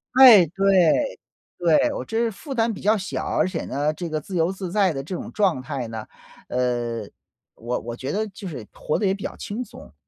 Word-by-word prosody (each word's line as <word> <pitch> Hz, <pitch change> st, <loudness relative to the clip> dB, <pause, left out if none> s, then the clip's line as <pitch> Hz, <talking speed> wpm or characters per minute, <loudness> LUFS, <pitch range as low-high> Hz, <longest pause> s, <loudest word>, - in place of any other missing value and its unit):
哎， 240 Hz, -9 st, +10 dB
对， 195 Hz, -, +2 dB, 0.4 s
对。 175 Hz, -, +3 dB
我 -, -, -4 dB
这 225 Hz, -, -5 dB
是 230 Hz, 0 st, +2 dB
负 270 Hz, +6 st, -7 dB
担 230 Hz, -1 st, +1 dB
比 205 Hz, -, -8 dB
较 215 Hz, +2 st, +3 dB
小， 200 Hz, 0 st, -4 dB
而 -, -, +1 dB
且 185 Hz, -3 st, -4 dB
呢， 145 Hz, +3 st, 0 dB
这 170 Hz, +2 st, -5 dB
个 155 Hz, 0 st, -1 dB
自 185 Hz, +5 st, -8 dB
由 165 Hz, +1 st, +2 dB
自 190 Hz, -2 st, -5 dB
在 195 Hz, -3 st, +3 dB
的 135 Hz, -3 st, -3 dB
这 180 Hz, +6 st, -6 dB
种 -, -, -6 dB
状 190 Hz, -11 st, +2 dB
态 130 Hz, -1 st, -4 dB
呢， 110 Hz, -1 st, -6 dB, 0.4 s
呃， 120 Hz, -3 st, -1 dB, 0.5 s
我 120 Hz, +2 st, -3 dB
我 120 Hz, 0 st, -6 dB
觉 130 Hz, +3 st, -5 dB
得 215 Hz, +4 st, -1 dB
就 195 Hz, 0 st, -8 dB
是 125 Hz, -9 st, -7 dB
活 -, -, -2 dB
得 210 Hz, -, -1 dB
也 190 Hz, -, +3 dB
比 195 Hz, -, -6 dB
较 -, -, -5 dB
轻 220 Hz, +5 st, -5 dB
松。 250 Hz, +4 st, -12 dB
180 Hz, 240 characters per minute, -23 LUFS, 135-210 Hz, 0.5 s, 哎